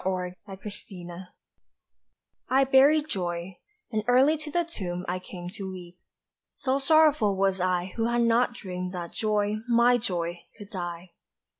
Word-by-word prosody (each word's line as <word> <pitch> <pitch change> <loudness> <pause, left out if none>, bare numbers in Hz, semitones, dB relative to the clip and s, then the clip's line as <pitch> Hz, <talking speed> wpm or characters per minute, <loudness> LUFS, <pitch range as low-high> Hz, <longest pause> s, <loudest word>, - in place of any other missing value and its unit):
Resurrection 185 0 -6 1.2
I 265 +1 +5
BURIED 280 +3 +5
Joy; 175 - -4 0.3
and 215 -2 -1
early 260 +5 +5
to 300 0 -6
the 345 +3 +1
tomb 180 - -4
I 180 +1 -1
came 180 -1 -9
to 195 -2 -6
weep 180 -1 -10 0.6
so 270 0 0
sorrowful 285 -8 +4
was 195 -1 +1
I 180 0 0
Who 225 - +1
had 240 0 +2
not 235 +1 +3
dreamed 180 -3 -5
that 170 -1 -5
Joy, 210 -1 0
my 240 +1 +5
Joy, 175 -6 -3 0.2
could 205 -2 -11
die. 175 -1 -5
195 Hz, 140 wpm, -27 LUFS, 180-245 Hz, 1.2 s, I